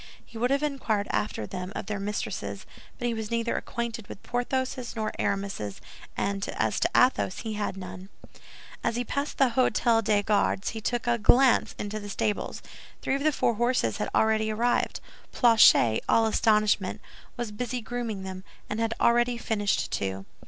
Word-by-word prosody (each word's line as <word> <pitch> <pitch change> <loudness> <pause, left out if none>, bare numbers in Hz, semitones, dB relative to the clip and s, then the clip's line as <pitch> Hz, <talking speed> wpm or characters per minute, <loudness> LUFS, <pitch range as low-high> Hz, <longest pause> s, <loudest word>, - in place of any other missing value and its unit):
He - - -19
would 240 +2 0
have 280 +2 +1
inquired 240 -8 -1
after 210 - -1
them 185 0 -6
of - - -4
their 205 -1 -3
mistresses, 205 +1 -4 0.3
but 245 - -4
he 235 - 0
was 220 -2 -4
neither 230 0 0
acquainted 235 -3 -4
with - - -10
Porthos's 255 0 -2
nor 215 -1 -2
Aramis's, 195 - -2 0.4
and 200 0 -1
as - - 0
to - - +2
Athos, 250 -7 +3
he 220 -2 -4
had 205 -2 -3
none. 185 0 -8 0.7
As 230 - 0
he 245 - 0
passed 280 +4 -3
the 265 -3 +4
Hôtel 230 -2 +3
des 205 0 +2
Gardes, 205 -2 +1
he 220 - -6
took 240 +2 -1
a 240 -1 +1
glance 250 +4 +4
into 210 +1 -4
the 205 -1 -8
stables. 210 +1 -2 0.4
Three - - 0
of 275 +1 -1
the 310 - +4
four 240 - +1
horses 235 - +1
had 105 - -2
already 220 0 +3
arrived. 235 +3 0 0.3
Planchet, 220 - +5
all 225 - +5
astonishment, 215 -3 +2 0.4
was 240 -3 -3
busy 245 +3 -3
grooming 230 -4 -4
them, 190 0 -7 0.3
and 210 - -2
had 225 0 0
already 240 +1 +3
finished 205 -3 -1
two. 95 0 -3
220 Hz, 175 wpm, -27 LUFS, 205-240 Hz, 0.7 s, Planchet